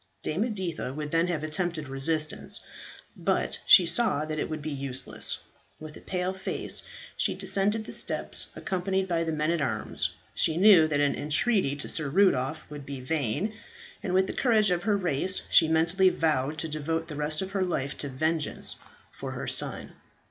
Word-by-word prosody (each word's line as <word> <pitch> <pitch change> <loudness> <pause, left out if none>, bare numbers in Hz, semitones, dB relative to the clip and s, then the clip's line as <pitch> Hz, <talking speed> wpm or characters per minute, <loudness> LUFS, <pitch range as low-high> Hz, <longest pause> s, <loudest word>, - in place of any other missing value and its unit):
Dame 185 +9 0
Editha 180 - -3
would 150 -1 -4
then 165 +1 +2
have 165 -4 -2
attempted 155 -1 -2
resistance; 150 +3 -1 0.5
but 60 0 -1
she 180 - +9
saw 170 -3 +1
that 155 0 -3
it - - -2
would 155 -2 -4
be 155 - -3
useless. 135 -2 -1 0.4
With 155 -1 -9
a - - -11
pale 185 0 -2
face 190 0 -3 0.3
she - - 0
descended 210 +3 0
the - - -8
steps, - - -2
accompanied 190 +1 -1
by 170 -2 0
the 165 - -2
men 155 +1 0
at 170 -2 0
arms. - - 0 0.2
She 160 - +1
knew 185 -4 +7
that 145 -2 0
any 145 -1 +1
entreaty 155 - +1
to 145 - -5
Sir 150 -3 0
Rudolph 155 -4 +2
would 145 -1 -7
be 140 -1 -6
vain, 145 - -1 0.5
and 195 - -3
with 190 +1 +4
the - - -4
courage 215 -6 +3
of 175 -1 +1
her 205 0 +2
race 180 0 +2
she 165 - +7
mentally 165 +4 +4
vowed 155 -4 0
to 160 - -2
devote 160 +2 -2
the 150 - -6
rest 150 +4 -1
of 190 - -7
her 195 -1 -1
life 140 -6 -2
to 145 - -3
vengeance 155 +3 -1 0.3
for - - -6
her - - -5
son. - - -2
160 Hz, 185 wpm, -28 LUFS, 150-185 Hz, 0.5 s, she